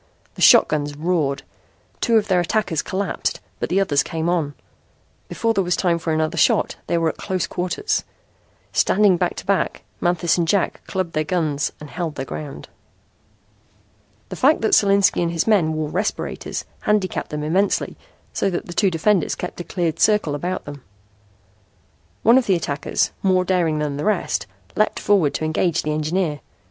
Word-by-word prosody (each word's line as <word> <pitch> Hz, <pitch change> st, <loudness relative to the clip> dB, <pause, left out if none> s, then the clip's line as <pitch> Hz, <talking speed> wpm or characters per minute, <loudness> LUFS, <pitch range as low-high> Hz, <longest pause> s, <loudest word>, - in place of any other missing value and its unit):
The -, -, -10 dB
shotguns 145 Hz, -1 st, +5 dB
roared. 155 Hz, -4 st, 0 dB, 0.6 s
Two 230 Hz, -2 st, +3 dB
of 215 Hz, -1 st, +1 dB
their 185 Hz, -3 st, +3 dB
attackers 175 Hz, -4 st, 0 dB
collapsed, 195 Hz, 0 st, -2 dB, 0.2 s
but -, -, -2 dB
the 190 Hz, -, +2 dB
others 150 Hz, -8 st, +2 dB
came 165 Hz, +1 st, -2 dB
on. 155 Hz, -5 st, -1 dB, 0.7 s
Before 230 Hz, -1 st, 0 dB
there 195 Hz, -, +1 dB
was 180 Hz, 0 st, 0 dB
time 170 Hz, -3 st, +1 dB
for 165 Hz, 0 st, -2 dB
another 155 Hz, 0 st, 0 dB
shot -, -, +3 dB
they 170 Hz, -, +1 dB
were 165 Hz, -1 st, +2 dB
at -, -, -6 dB
close 185 Hz, -3 st, -2 dB
quarters. 180 Hz, -, -2 dB, 0.7 s
Standing 205 Hz, -1 st, +4 dB
back 175 Hz, 0 st, -1 dB
to -, -, -8 dB
back, 195 Hz, -1 st, 0 dB, 0.2 s
Manthis 175 Hz, 0 st, +1 dB
and 170 Hz, -, +1 dB
Jack 195 Hz, +2 st, 0 dB
clubbed 185 Hz, -3 st, -3 dB
their 155 Hz, -, +1 dB
guns 155 Hz, -4 st, -1 dB
and 150 Hz, -1 st, -10 dB
held 165 Hz, -4 st, -4 dB
their 135 Hz, -, -4 dB
ground. 145 Hz, +1 st, -7 dB, 1.6 s
The -, -, -5 dB
fact 295 Hz, +4 st, +3 dB
that 220 Hz, -, +1 dB
Solinski 200 Hz, -2 st, +4 dB
and 170 Hz, -1 st, 0 dB
his 165 Hz, -1 st, 0 dB
men 185 Hz, -8 st, +3 dB
wore 155 Hz, -1 st, -2 dB
respirators 195 Hz, +6 st, -3 dB
handicapped 210 Hz, -4 st, 0 dB
them 150 Hz, 0 st, -4 dB
immensely, 185 Hz, +6 st, 0 dB, 0.4 s
so -, -, 0 dB
that 175 Hz, -, -3 dB
the 175 Hz, -, -8 dB
two 195 Hz, +2 st, +3 dB
defenders 180 Hz, +1 st, +1 dB
kept 180 Hz, -, -6 dB
a -, -, -3 dB
cleared 170 Hz, -3 st, -2 dB
circle 210 Hz, -8 st, +3 dB
about 180 Hz, +5 st, -3 dB
them. 145 Hz, -1 st, -9 dB, 1.4 s
One 235 Hz, +4 st, +6 dB
of 255 Hz, -, -4 dB
the 190 Hz, -, +4 dB
attackers, 150 Hz, -3 st, -1 dB
more 185 Hz, -1 st, +2 dB
daring 175 Hz, -5 st, +1 dB
than 150 Hz, -2 st, -2 dB
the 145 Hz, -, -3 dB
rest, 215 Hz, -, 0 dB, 0.3 s
leaped 215 Hz, -, +1 dB
forward 190 Hz, -8 st, +2 dB
to 155 Hz, -, -2 dB
engage 160 Hz, +2 st, 0 dB
the 150 Hz, -, -1 dB
engineer. 155 Hz, 0 st, -1 dB
175 Hz, 175 wpm, -21 LUFS, 155-195 Hz, 1.6 s, One